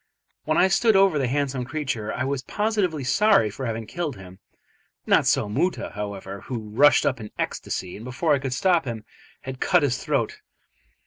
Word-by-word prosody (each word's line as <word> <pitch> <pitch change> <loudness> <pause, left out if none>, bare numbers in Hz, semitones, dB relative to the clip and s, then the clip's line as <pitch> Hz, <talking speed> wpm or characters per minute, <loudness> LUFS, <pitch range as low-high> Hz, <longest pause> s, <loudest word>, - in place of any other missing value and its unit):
When - - +1
I 185 - +5
stood 215 +3 +3
over 195 -6 +4
the 135 - 0
handsome 135 -1 -1
creature 130 -6 -3
I 130 - -2
was 135 0 -2
positively 195 - -1
sorry 125 - +3
for 130 +5 -5
having 115 0 -3
killed 165 +3 -4
him. 95 -1 -13 0.7
Not - - +3
so - - +2
Moota, 160 - -1
however, 100 -1 -6
who 115 -4 -6
rushed 145 +7 +5
up 130 -3 0
in 105 -1 -8
ecstasy, 90 -2 -4
and 105 - -10
before 145 +5 0
I 140 - +2
could 135 -1 -3
stop 175 +3 +2
him 115 -3 -5 0.4
had 130 -1 -7
cut 180 -4 +3
his 130 -3 0
throat. - - -1
130 Hz, 185 wpm, -24 LUFS, 110-165 Hz, 0.7 s, I